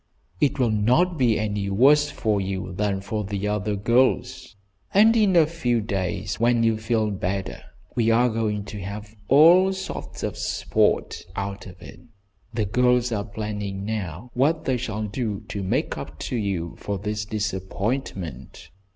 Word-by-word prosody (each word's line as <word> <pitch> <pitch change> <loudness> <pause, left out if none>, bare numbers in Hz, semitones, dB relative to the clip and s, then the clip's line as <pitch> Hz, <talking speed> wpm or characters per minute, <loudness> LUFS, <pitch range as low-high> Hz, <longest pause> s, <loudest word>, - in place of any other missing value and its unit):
"It 145 - +2
will 125 -4 +2
not 125 +11 +2
be 120 -4 +3
any 105 -2 -2
worse 145 +8 +5
for 105 -7 0
you 95 -1 -4
than 100 0 -1
for 105 +2 -3
the 100 0 -3
other 105 0 -1
girls, 125 +3 +1 0.4
and 220 +3 +6
in 210 -5 +3
a 165 -2 +7
few 140 -7 0
days 95 -2 -3
when 120 0 +3
you 115 -1 +3
feel 110 -1 0
better 95 0 -3 0.3
we 115 -2 +2
are 120 +2 +4
going 110 -3 -1
to 105 -1 -7
have 105 +3 -7
all 170 +7 +7
sorts 190 0 -6
of - - -3
sport - - 0
out 100 0 -4
of 90 -1 -12
it. - - -11 0.5
The 110 -2 -1
girls 125 +3 +2
are 105 -3 -1
planning 105 -2 -5
now 105 0 -4
what 155 +6 +1
they 130 -2 +1
shall 110 -3 -3
do 105 -1 -3
to 100 - -3
make 95 - -1
up - - -8
to - - 0
you 95 -6 -2
for 100 -1 -3
this 105 +2 -3
disappointment. 100 - -4
110 Hz, 160 wpm, -24 LUFS, 100-125 Hz, 0.5 s, a